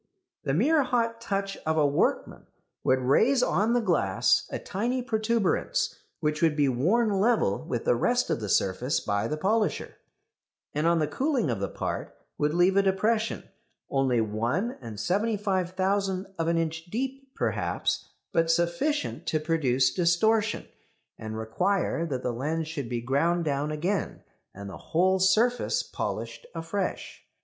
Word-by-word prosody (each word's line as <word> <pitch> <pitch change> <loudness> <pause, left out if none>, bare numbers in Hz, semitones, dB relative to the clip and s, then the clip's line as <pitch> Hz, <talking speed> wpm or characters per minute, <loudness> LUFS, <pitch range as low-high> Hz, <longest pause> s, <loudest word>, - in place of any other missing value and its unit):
The 135 - 0
mere 295 - +4
hot 230 -3 0
touch 195 -2 -2
of 160 0 -2
a 150 - +4
workman 145 0 0 0.4
would 130 0 +2
raise 235 - +3
on 215 +2 +2
the 245 - +3
glass 160 - +2
a - - -3
tiny 245 +6 -2
protuberance, 220 -4 0 0.3
which 150 -1 0
would 160 -3 +3
be 145 -2 +3
worn 185 - +2
level 210 - +2
with 120 -2 -3
the - - +4
rest 245 - +1
of - - 0
the 105 -2 -4
surface 110 +10 +1
by 100 0 -1
the 150 - -2
polisher, 210 +5 0 0.8
and 150 +3 +1
on 170 0 +4
the 155 - +2
cooling 260 - 0
of 115 - -2
the 100 - -2
part - - -4 0.2
would 150 0 +2
leave 175 +3 +3
a - - +7
depression, 215 +3 0 0.5
only 135 -3 +2
1 115 - -2
75,000 190 - 0
of 165 - 0
an 170 0 +2
inch 165 0 -2
deep, 265 +7 -5
perhaps, - - -1 0.2
but 165 0 +2
sufficient 170 - 0
to 155 - +1
produce 145 -5 +2
distortion, 210 +5 +2 0.5
and 110 0 -5
require 165 - 0
that 130 -4 -3
the 125 - -1
lens 155 +6 -2
should 145 -7 -5
be 120 -1 -2
ground 165 +7 +1
down 145 0 -1
again, 175 +7 -2 0.3
and 100 +1 -9
the 95 - -8
whole 185 +3 +1
surface 220 +6 +2
polished 480 - -5
afresh. - - -4
170 Hz, 150 wpm, -27 LUFS, 140-215 Hz, 0.8 s, a